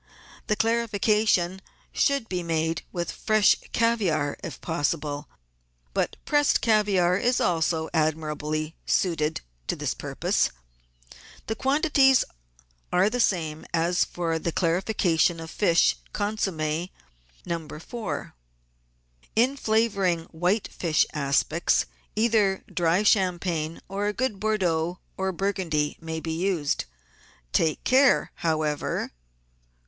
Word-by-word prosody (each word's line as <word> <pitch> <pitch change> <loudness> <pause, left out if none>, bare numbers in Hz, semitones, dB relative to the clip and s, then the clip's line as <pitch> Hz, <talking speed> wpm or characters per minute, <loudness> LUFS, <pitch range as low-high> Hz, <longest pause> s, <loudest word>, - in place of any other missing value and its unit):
The 210 - +2
clarification 210 -5 +1 0.3
should 280 -5 +1
be 180 -3 -2
made 165 -1 -1
with 175 -1 -3
fresh 215 -2 +3 0.2
caviare 190 -11 +1
if 165 -8 -6
pos 160 -4 0
sible, 145 -1 -6 0.7
but - - 0
pressed 290 -1 +3
caviare 200 -5 +3
is 245 +1 +2
also 160 -1 +1
admirably 155 0 -1
suited 160 -4 +1 0.3
to - - 0
this - - -2
purpose. - - 0 1.0
The 220 - -2
quantities 270 0 +3 0.7
are 190 +4 +3
the 245 - -2
same 160 -8 0
as 170 +2 +2
for 165 -2 -2
the 170 - -2
clarification 175 -1 +1
of 165 0 -8
fish 170 - +3 0.2
con 205 +1 -1
somm6. 160 -2 -1 0.6
No. 165 -2 -3
4. 165 - -6 1.0
In 250 +5 +3
flavouring 210 -8 +1
white 180 +6 0
fish 160 -3 +1
aspics 150 +3 +1 0.3
either 215 -3 +2
dry 175 +3 +2
champagne 175 -5 +1
or 200 +1 -2
a 210 - 0
good 255 -4 -2
Bordeaux 180 -5 0 0.2
or 190 0 -1
Burgundy 175 -6 -1
may 160 0 -4
be 160 0 -4
used. 165 - 0 0.7
Take 160 -2 +1
care, 265 +1 +4
how 160 -3 0
ever— 150 -1 -1
1. - - -6
175 Hz, 115 wpm, -26 LUFS, 160-215 Hz, 1.0 s, care